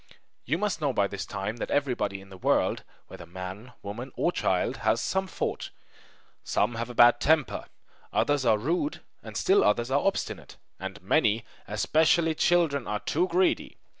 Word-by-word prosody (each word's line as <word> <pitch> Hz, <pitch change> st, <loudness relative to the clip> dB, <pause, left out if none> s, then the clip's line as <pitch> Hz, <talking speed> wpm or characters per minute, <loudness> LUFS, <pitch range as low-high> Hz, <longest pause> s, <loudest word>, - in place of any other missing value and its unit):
You 150 Hz, +6 st, 0 dB
must 205 Hz, -3 st, -1 dB
know 145 Hz, -2 st, +1 dB
by 100 Hz, -4 st, +2 dB
this 100 Hz, -1 st, -5 dB
time 105 Hz, +4 st, -4 dB
that -, -, -4 dB
everybody 125 Hz, -9 st, -1 dB
in 95 Hz, -, -15 dB
the 95 Hz, -, -11 dB
world -, -, +1 dB, 0.2 s
whether -, -, -11 dB
man, 95 Hz, +7 st, -8 dB
woman, 115 Hz, +6 st, -6 dB
or -, -, +1 dB
child -, -, 0 dB
has -, -, +1 dB
some 190 Hz, 0 st, -1 dB
fault. -, -, -3 dB, 0.7 s
Some 115 Hz, +4 st, 0 dB
have 115 Hz, +1 st, -4 dB
a 120 Hz, -, -8 dB
bad 120 Hz, 0 st, +7 dB
temper, 150 Hz, -5 st, +1 dB, 0.5 s
others 145 Hz, -2 st, +1 dB
are 110 Hz, -3 st, +4 dB
rude, 170 Hz, -, -1 dB, 0.2 s
and -, -, -7 dB
still 395 Hz, +1 st, +4 dB
others 120 Hz, +2 st, +1 dB
are 140 Hz, -, +4 dB
obstinate; 195 Hz, -, -2 dB, 0.2 s
and 95 Hz, +1 st, -6 dB
many, 110 Hz, -1 st, +2 dB, 0.2 s
especially 160 Hz, +9 st, +2 dB
children, 155 Hz, -5 st, +2 dB
are 105 Hz, 0 st, -2 dB
too 175 Hz, +4 st, 0 dB
greedy! 185 Hz, +1 st, +1 dB
125 Hz, 165 wpm, -27 LUFS, 105-160 Hz, 0.7 s, bad